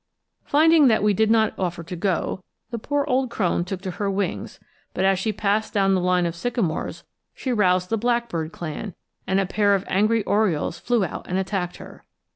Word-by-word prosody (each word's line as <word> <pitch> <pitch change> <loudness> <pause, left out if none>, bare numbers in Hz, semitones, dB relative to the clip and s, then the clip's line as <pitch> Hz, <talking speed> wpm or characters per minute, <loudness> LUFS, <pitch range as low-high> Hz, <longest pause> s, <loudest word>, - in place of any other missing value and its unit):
Finding 315 0 +5
that 220 -3 +3
we 210 -1 +4
did 220 +2 +2
not 220 -1 +3
offer 175 -2 -2
to 170 +2 -7
go, 185 +1 -1 0.3
the 235 - -3
poor 285 +5 -1
old 260 -2 +1
crone 180 -6 0
took 185 0 -5
to 190 - -3
her 200 - +1
wings; 195 +1 -3 0.4
but 185 - +1
as 195 -1 +3
she 215 +3 0
passed 210 +2 -1
down 195 -1 +3
the 185 - +2
line 180 0 +2
of 170 - -1
sycamores 195 -3 -2 0.3
she 255 - -2
roused 185 -3 +2
the 225 - +1
blackbird 235 -9 -1
clan, 170 +4 -6 0.3
and 190 +1 +2
a 195 - +1
pair 200 +1 +2
of 195 - -3
angry 215 +3 +2
orioles 180 -6 0
flew 235 -5 +1
out - - -7
and 180 - 0
attacked 190 -2 -2
her. - - -12
200 Hz, 200 wpm, -23 LUFS, 180-225 Hz, 0.4 s, Finding